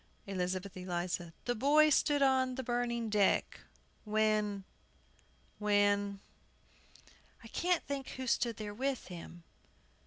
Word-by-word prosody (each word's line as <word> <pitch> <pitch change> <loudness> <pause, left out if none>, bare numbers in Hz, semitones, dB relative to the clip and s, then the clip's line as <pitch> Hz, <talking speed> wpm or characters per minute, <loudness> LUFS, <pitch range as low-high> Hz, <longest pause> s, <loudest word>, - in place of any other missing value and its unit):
ELIZABETH 185 0 -3
ELIZA. 175 -1 -3
"The 245 - +1
boy 295 +6 +4
stood 290 0 +3
on 260 -1 +3
the 265 - -4
burning 240 -1 -1
deck, 210 -2 +2 0.4
When 215 -2 +1 1.0
When 205 -1 +2 0.5
" - - -26
I - - -10
can't 355 -1 +1
think 275 -2 -4
who 260 - -4
stood 235 -2 +1
there 210 -1 -5
with 265 +2 -2
him. 175 -1 -9
215 Hz, 120 wpm, -33 LUFS, 200-260 Hz, 1.0 s, boy